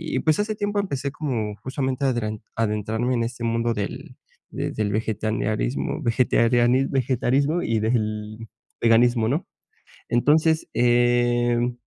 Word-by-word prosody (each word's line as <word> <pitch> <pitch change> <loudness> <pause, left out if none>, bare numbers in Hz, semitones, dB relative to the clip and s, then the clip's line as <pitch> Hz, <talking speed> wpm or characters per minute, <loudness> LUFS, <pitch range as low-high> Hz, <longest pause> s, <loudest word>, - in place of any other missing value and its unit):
y - - +2
pues, 155 +4 +1
hace 215 +1 -1
tiempo 205 0 -1
empecé 140 -8 -2
como 120 -9 -3
justamente, 135 +1 -2
adren 110 -5 -1
adentrarme 110 +2 -1
en 115 - 0
este 120 0 -5
mundo 115 0 0
del 100 -2 -6 0.3
de - - -3
del 105 -1 -2
vegetaniarismo, 110 - -2
vegetariani 120 +2 +3
vegetarismo 135 +5 +1
y 110 -1 0
del 110 -1 -2 0.3
veganismo, 115 0 +4
¿no?, 145 +9 -1 0.6
entonces, 155 +6 +2
em. 120 0 +2
120 Hz, 120 wpm, -23 LUFS, 110-135 Hz, 0.6 s, veganismo